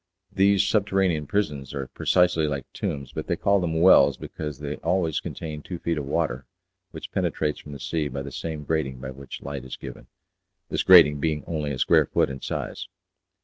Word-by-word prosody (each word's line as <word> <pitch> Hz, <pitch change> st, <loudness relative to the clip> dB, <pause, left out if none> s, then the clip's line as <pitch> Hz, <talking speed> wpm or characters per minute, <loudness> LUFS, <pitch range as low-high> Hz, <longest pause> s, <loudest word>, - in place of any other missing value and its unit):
These 100 Hz, 0 st, +4 dB
subterranean 95 Hz, -7 st, +1 dB
prisons 70 Hz, -10 st, -2 dB
are 70 Hz, -1 st, -3 dB
precisely 90 Hz, +2 st, +2 dB
like 70 Hz, -2 st, -3 dB
tombs, 70 Hz, -2 st, -4 dB
but -, -, -5 dB
they -, -, +1 dB
call 100 Hz, 0 st, +2 dB
them 80 Hz, -3 st, -1 dB
"wells," 95 Hz, -, +6 dB
because 75 Hz, -3 st, -6 dB
they 75 Hz, 0 st, -5 dB
always 85 Hz, -2 st, 0 dB
contain 75 Hz, -2 st, -6 dB
two 90 Hz, +3 st, -6 dB
feet 85 Hz, -2 st, -2 dB
of 70 Hz, -, -5 dB
water, 65 Hz, -5 st, -1 dB, 0.4 s
which -, -, -9 dB
penetrates 75 Hz, -1 st, -1 dB
from 75 Hz, -, -10 dB
the 70 Hz, -, -8 dB
sea 80 Hz, +2 st, -2 dB
by 70 Hz, 0 st, -5 dB
the 70 Hz, -, -7 dB
same 80 Hz, +1 st, -5 dB
grating 75 Hz, -4 st, -1 dB
by 65 Hz, +1 st, -7 dB
which 70 Hz, 0 st, -9 dB
light 70 Hz, -2 st, -5 dB
is 65 Hz, -, -7 dB
given, 65 Hz, -3 st, -10 dB, 0.6 s
this -, -, 0 dB
grating 80 Hz, -6 st, +7 dB
being 75 Hz, 0 st, -1 dB
only 75 Hz, -3 st, -3 dB
a 70 Hz, -, -3 dB
square -, -, +4 dB
foot -, -, +1 dB
in 65 Hz, 0 st, -7 dB
size. -, -, -4 dB
75 Hz, 190 wpm, -25 LUFS, 70-85 Hz, 0.6 s, grating